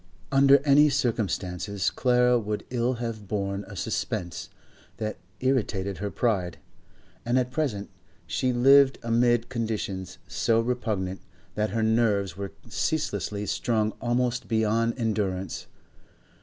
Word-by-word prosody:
Under 140 Hz, 0 st, +7 dB
any 145 Hz, +1 st, +6 dB
circumstances 100 Hz, -, -1 dB
Clara 125 Hz, -1 st, +3 dB
would 105 Hz, -1 st, -4 dB
ill 125 Hz, 0 st, +1 dB
have 115 Hz, -3 st, -5 dB
borne 100 Hz, 0 st, -2 dB
a -, -, -9 dB
suspense 85 Hz, -2 st, -3 dB, 0.5 s
that 110 Hz, -1 st, -4 dB, 0.2 s
irritated 100 Hz, -8 st, 0 dB
her 100 Hz, +1 st, -2 dB
pride, 100 Hz, -7 st, -1 dB, 0.7 s
and 120 Hz, +2 st, +1 dB
at 125 Hz, -1 st, 0 dB
present 130 Hz, -9 st, -1 dB, 0.4 s
she 130 Hz, -, 0 dB
lived 135 Hz, +2 st, +6 dB
amid 120 Hz, 0 st, +2 dB
conditions 110 Hz, -6 st, -3 dB
so 115 Hz, -1 st, +1 dB
repugnant, 110 Hz, -6 st, -2 dB, 0.3 s
that 105 Hz, 0 st, 0 dB
her 110 Hz, +3 st, -1 dB
nerves 110 Hz, -5 st, +2 dB
were 100 Hz, 0 st, -5 dB, 0.2 s
ceaselessly 105 Hz, -, -2 dB
strung 110 Hz, +1 st, 0 dB
almost 120 Hz, +1 st, 0 dB
beyond 115 Hz, +1 st, +1 dB
endurance. 100 Hz, -5 st, -2 dB
115 Hz, 115 wpm, -26 LUFS, 100-125 Hz, 0.7 s, Under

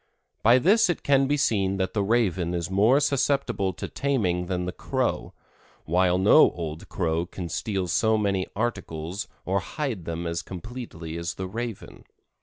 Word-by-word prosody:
By 115 Hz, +3 st, +6 dB
this 190 Hz, -, +4 dB
it 175 Hz, -, -1 dB
can 135 Hz, -1 st, +3 dB
be 145 Hz, +1 st, +1 dB
seen 100 Hz, -8 st, +1 dB
that 95 Hz, -1 st, -1 dB
the 105 Hz, -, +1 dB
Raven 95 Hz, -5 st, +1 dB
is 85 Hz, +1 st, -3 dB
more 110 Hz, +8 st, +4 dB
susceptible 140 Hz, -8 st, +1 dB
to -, -, -6 dB
taming 95 Hz, -11 st, -1 dB
than 90 Hz, -1 st, -2 dB
the 90 Hz, -, -2 dB
Crow, -, -, -2 dB, 0.5 s
while 90 Hz, +2 st, +2 dB
no 100 Hz, +11 st, +6 dB
old 80 Hz, -2 st, -6 dB
Crow 85 Hz, -1 st, -1 dB
can 90 Hz, -2 st, -6 dB
steal 95 Hz, +2 st, -2 dB
so 110 Hz, +5 st, +2 dB
many 100 Hz, -3 st, 0 dB
articles 95 Hz, -5 st, -3 dB, 0.2 s
or 95 Hz, +2 st, +1 dB
hide 110 Hz, -, -4 dB
them 85 Hz, +1 st, -4 dB
as 85 Hz, 0 st, -2 dB
completely 90 Hz, -5 st, -7 dB
as 85 Hz, 0 st, -4 dB
the 95 Hz, -, -4 dB
Raven. 115 Hz, +1 st, -6 dB
95 Hz, 165 wpm, -26 LUFS, 85-120 Hz, 0.5 s, By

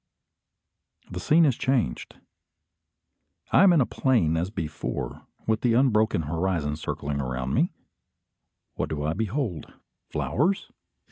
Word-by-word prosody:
The 90 Hz, -, -4 dB
scene 160 Hz, -, +4 dB
is 135 Hz, -5 st, +3 dB
changed. 130 Hz, -, -1 dB, 1.4 s
I -, -, +6 dB
am 195 Hz, -1 st, +7 dB
in 165 Hz, -4 st, +5 dB
a -, -, +3 dB
plain 115 Hz, -, +1 dB
as 85 Hz, +3 st, -1 dB
before, 80 Hz, -6 st, -5 dB, 0.2 s
with 110 Hz, 0 st, +1 dB
the 120 Hz, -2 st, +2 dB
unbroken 110 Hz, -8 st, +3 dB
horizon 80 Hz, -1 st, -1 dB
circling 70 Hz, -2 st, -3 dB
around 65 Hz, 0 st, -3 dB
me. -, -, +2 dB, 1.0 s
What -, -, -3 dB
do 75 Hz, -2 st, -3 dB
I 80 Hz, +2 st, 0 dB
behold? 110 Hz, -, -3 dB, 0.4 s
Flowers? 185 Hz, -, 0 dB
95 Hz, 125 wpm, -26 LUFS, 75-130 Hz, 1.4 s, am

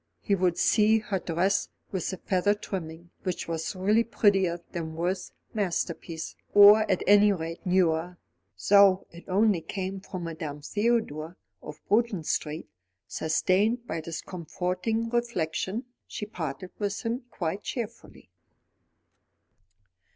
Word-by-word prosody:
He 200 Hz, -, -1 dB
would 180 Hz, -3 st, +2 dB
see 215 Hz, +1 st, +4 dB
her 210 Hz, -3 st, -2 dB
dress 180 Hz, +4 st, 0 dB, 0.2 s
with 190 Hz, -4 st, -2 dB
the 190 Hz, -, -4 dB
feather 195 Hz, +3 st, +1 dB
trimming, 170 Hz, -4 st, -7 dB
which 185 Hz, -2 st, -3 dB
was 165 Hz, +3 st, -3 dB
really 210 Hz, +5 st, +3 dB
prettier 195 Hz, -6 st, +2 dB
than 160 Hz, -2 st, -5 dB
Worth's 180 Hz, +3 st, -2 dB, 0.2 s
masterpiece, 170 Hz, -4 st, -3 dB, 0.2 s
or, 205 Hz, +1 st, +8 dB
at 190 Hz, -, +1 dB
any 205 Hz, 0 st, +6 dB
rate, 165 Hz, -2 st, -4 dB
newer; 175 Hz, -1 st, +2 dB, 0.5 s
though 200 Hz, -2 st, +6 dB
it 170 Hz, +1 st, -13 dB
only 200 Hz, -1 st, +3 dB
came 190 Hz, +3 st, -4 dB
from 185 Hz, -2 st, -7 dB
Madame 155 Hz, -3 st, -6 dB
Theodore, 195 Hz, -6 st, -1 dB, 0.2 s
of 150 Hz, -, -9 dB
Bruton 210 Hz, -4 st, +2 dB
Street. 150 Hz, +1 st, -2 dB, 0.4 s
Sustained 200 Hz, +9 st, +1 dB
by 165 Hz, -, -3 dB
this 165 Hz, 0 st, -6 dB
comforting 180 Hz, +6 st, -2 dB
reflection, 230 Hz, -2 st, -1 dB, 0.2 s
she 210 Hz, -, -5 dB
parted 175 Hz, -4 st, -6 dB
with 205 Hz, -1 st, -2 dB
him 240 Hz, +2 st, -2 dB
quite 185 Hz, +1 st, -3 dB
cheerfully. 230 Hz, -, -7 dB
185 Hz, 125 wpm, -27 LUFS, 165-210 Hz, 0.5 s, or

